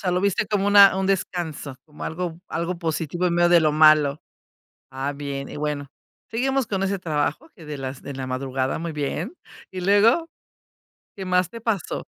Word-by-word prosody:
sea, 180 -2 0
lo 180 - +1
viste 200 +1 +1
como 205 -1 0
una 200 -2 +8
un 190 0 0
descanso, 170 -7 -2
como 150 -1 -10
algo 170 0 -4
algo 170 +2 -3
positivo 165 +1 -2
en 170 - +1
medio 175 0 +4
de 175 - +6
lo 155 -2 +2
malo. 155 -2 +5 0.7
Ah, 135 +2 -3
bien, 140 -1 -5
y - - -8
bueno, 145 -2 -3 0.4
seguimos 265 +1 0
con 195 -1 -1
ese 195 -1 -1
trabajo 165 - -2
que 165 - -13
de 150 -1 -6
las 130 -1 -5
de 140 - -7
la 130 -1 -5
madrugada, 130 +1 -2
muy 165 0 -4
bien, 150 - -3 0.4
¿y 185 - -5
luego? 220 - +4 0.9
¿Qué 190 - -5
más 180 -1 +2
te 230 - -9
pasó? 215 -6 -2
170 Hz, 185 wpm, -23 LUFS, 145-195 Hz, 0.9 s, una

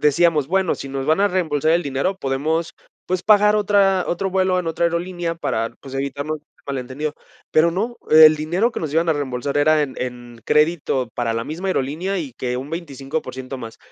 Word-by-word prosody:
decíamos, 150 -1 +3
bueno, 190 -1 +1
si 135 - -7
nos 135 0 -4
van 160 +5 +3
a 205 - +4
reembolsar 160 -5 +1
el 170 +1 +2
dinero, 140 +8 -1
podemos, 155 +4 -1 0.3
pues, 185 0 -1
pagar 210 0 +5
otra 200 -2 +3
otro 190 +2 -1
vuelo 185 -1 +2
en 180 - -3
otra 165 +1 -1
aerolínea 170 0 -2
para, 115 -8 -2
pues, 135 -1 -10
evitarnos 140 +3 -3 0.3
mal 140 -1 -3
entendido. 140 +4 -4 0.4
Pero 165 +2 +4
no, 220 +7 -2
el 155 0 +9
dinero 175 +10 0
que - - -5
nos 155 -3 -4
iban 165 +1 +2
a - - +5
reembolsar 140 -1 -3
era 155 +1 +4
en 135 - -4
en 120 -2 -6
crédito 150 -5 +1
para 120 -2 -1
la 115 - -2
misma 170 +7 -4
aerolínea, 175 +6 -1
y 145 -6 -5
que 125 -1 -3
un 135 +3 -6
25% 135 -4 -5
más. 115 -2 -9
155 Hz, 195 wpm, -21 LUFS, 135-180 Hz, 0.4 s, el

